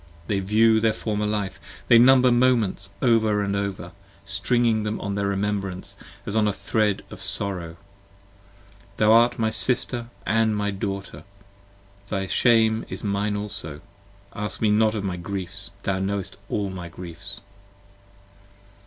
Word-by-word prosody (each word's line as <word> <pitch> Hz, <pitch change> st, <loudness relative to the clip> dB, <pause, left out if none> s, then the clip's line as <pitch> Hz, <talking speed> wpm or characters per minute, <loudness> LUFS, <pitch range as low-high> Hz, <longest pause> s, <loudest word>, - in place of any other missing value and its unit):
They 100 Hz, +1 st, -1 dB
view 110 Hz, +3 st, +3 dB
their 110 Hz, 0 st, +2 dB
former 105 Hz, -1 st, -2 dB
life: 100 Hz, -4 st, -3 dB, 0.3 s
they 115 Hz, -, +7 dB
number 130 Hz, 0 st, +6 dB
moments 120 Hz, -6 st, +2 dB
over 110 Hz, -4 st, +3 dB
and 100 Hz, 0 st, -1 dB
over: 100 Hz, -3 st, -4 dB, 0.3 s
Stringing 110 Hz, +3 st, +1 dB
them 105 Hz, +1 st, -3 dB
on 100 Hz, -, -3 dB
their 100 Hz, 0 st, -1 dB
remembrance 100 Hz, -2 st, -2 dB, 0.3 s
as 100 Hz, -, -4 dB
on 110 Hz, -1 st, +3 dB
a -, -, +2 dB
thread 105 Hz, +1 st, -1 dB
of -, -, -9 dB
sorrow. 90 Hz, -5 st, -3 dB, 1.2 s
Thou 105 Hz, 0 st, +4 dB
art 120 Hz, +2 st, +5 dB
my 110 Hz, -1 st, 0 dB
sister 120 Hz, +1 st, +4 dB, 0.2 s
and 110 Hz, +1 st, +2 dB
my 105 Hz, 0 st, -1 dB
daughter: 100 Hz, 0 st, -5 dB, 0.9 s
thy 95 Hz, -2 st, -2 dB
shame 110 Hz, +2 st, +3 dB
is -, -, -6 dB
mine 105 Hz, 0 st, -1 dB
also: 100 Hz, -8 st, -5 dB, 0.5 s
20 105 Hz, -, -5 dB
Ask -, -, -8 dB
me 110 Hz, -2 st, +2 dB
not 110 Hz, +1 st, +3 dB
of 105 Hz, -, -3 dB
my 95 Hz, -3 st, -3 dB
griefs! 95 Hz, +2 st, -4 dB
thou 95 Hz, -1 st, -1 dB
knowest 100 Hz, 0 st, -3 dB
all 100 Hz, -2 st, -2 dB
my 90 Hz, -2 st, -7 dB
griefs. 85 Hz, -1 st, -9 dB
105 Hz, 145 wpm, -24 LUFS, 100-110 Hz, 1.2 s, they